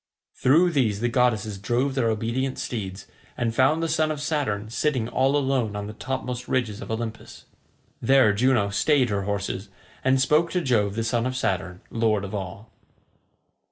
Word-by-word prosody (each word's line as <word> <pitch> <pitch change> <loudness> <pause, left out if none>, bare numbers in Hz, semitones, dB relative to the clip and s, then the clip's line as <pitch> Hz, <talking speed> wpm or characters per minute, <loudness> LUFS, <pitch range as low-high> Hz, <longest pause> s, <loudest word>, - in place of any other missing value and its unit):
Through 165 +7 +4
these 115 -10 +1
the 120 +2 0
goddesses 110 -5 +1
drove 120 +7 0
their 125 -4 +1
obedient 115 +5 -1
steeds, 95 -4 -5 0.3
and 115 -2 0
found 140 +7 +3
the - - +1
son 155 -1 +1
of 155 -2 -3
Saturn 130 -9 -2
sitting 130 -3 0
all 135 +4 +2
alone 130 -6 0
on 105 0 -4
the 105 - -7
topmost 125 +1 -4
ridges 115 -5 -1
of - - -8
Olympus. 110 0 -6 0.6
There 130 -3 +5
Juno 110 -2 +2
stayed 130 +3 +2
her 100 -1 -1
horses, 100 0 -3 0.3
and 130 0 +3
spoke 150 +6 +3
to 180 - +1
Jove 105 -8 +1
the 115 - -1
son 115 +1 0
of 130 - -3
Saturn, 95 -6 -2
lord 110 -3 +1
of 100 - -8
all. 100 +2 -6
120 Hz, 170 wpm, -25 LUFS, 105-135 Hz, 0.6 s, There